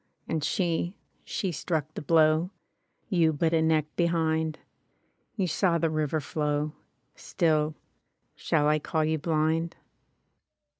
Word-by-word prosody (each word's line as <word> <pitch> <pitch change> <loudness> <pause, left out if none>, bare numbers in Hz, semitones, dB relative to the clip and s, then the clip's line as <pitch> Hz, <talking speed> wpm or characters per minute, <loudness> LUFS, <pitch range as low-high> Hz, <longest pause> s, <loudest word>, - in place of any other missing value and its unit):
And 160 -2 -1
she 170 +4 0
— - - -44
she 190 - -2
struck 155 -1 -2
the - - -5
blow. 155 +2 +3 0.6
You 170 -5 +3
but 160 +2 0
a 160 - +3
neck 160 -2 +2
behind... 160 -2 +1 0.8
You 195 - 0
saw 175 0 +2
the 165 -1 0
river 155 0 0
flow 150 +1 -1 0.2
— - - -46
Still, 155 -2 0 0.6
shall 150 -2 +1
I 155 0 +3
call 155 +1 0
you 160 0 0
blind? 160 +1 0
160 Hz, 135 wpm, -28 LUFS, 155-165 Hz, 0.8 s, blow